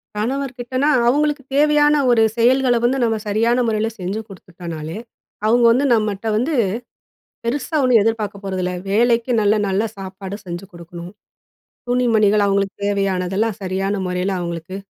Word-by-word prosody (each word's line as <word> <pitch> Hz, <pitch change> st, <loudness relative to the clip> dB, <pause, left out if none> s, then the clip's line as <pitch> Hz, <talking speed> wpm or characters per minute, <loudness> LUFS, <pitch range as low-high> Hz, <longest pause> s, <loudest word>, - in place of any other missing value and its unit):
கணவர்கிட்டனா, 255 Hz, +3 st, -2 dB, 0.2 s
அவங்களுக்கு 295 Hz, +1 st, +1 dB
தேவையான 295 Hz, 0 st, +4 dB, 0.2 s
ஒரு 230 Hz, -2 st, +4 dB, 0.2 s
செயல்கள 250 Hz, +1 st, +3 dB
வந்து 255 Hz, +3 st, +2 dB
நம்ம 225 Hz, -1 st, +1 dB
சரியான 230 Hz, +4 st, +2 dB
முறையில 220 Hz, 0 st, 0 dB
செஞ்சு 190 Hz, +4 st, -3 dB
குத்துட்டோம்னாலே, 170 Hz, -3 st, -8 dB, 0.5 s
அவங்க 240 Hz, +2 st, +3 dB
வந்து 265 Hz, +4 st, +2 dB
நம்மட்ட 215 Hz, -1 st, -1 dB
வந்து, 280 Hz, +8 st, 0 dB, 0.9 s
பெருசா 275 Hz, +5 st, -2 dB
ஒண்ணும் 250 Hz, -4 st, +5 dB
எதிர்பார்க்கப் 210 Hz, -3 st, -2 dB
போறதில்ல. 185 Hz, -1 st, -2 dB, 0.2 s
வேளைக்கு 235 Hz, +3 st, +2 dB
நல்ல 210 Hz, +1 st, +3 dB
நல்ல 195 Hz, +3 st, +1 dB
சாப்பாடு 190 Hz, +1 st, -7 dB
செஞ்சு 175 Hz, +2 st, -6 dB
குடுக்கணும். 170 Hz, +1 st, -10 dB, 0.8 s
துணி 250 Hz, 0 st, +1 dB
மணிகள் 210 Hz, -1 st, +4 dB
அவங்களுக்கு 195 Hz, 0 st, 0 dB
தேவையானதெல்லாம் 195 Hz, +1 st, -1 dB
சரியான 190 Hz, +2 st, -1 dB
முறையில 180 Hz, +2 st, -1 dB
அவங்களுக்கு 170 Hz, +1 st, -5 dB
215 Hz, 130 wpm, -20 LUFS, 190-245 Hz, 0.9 s, ஒண்ணும்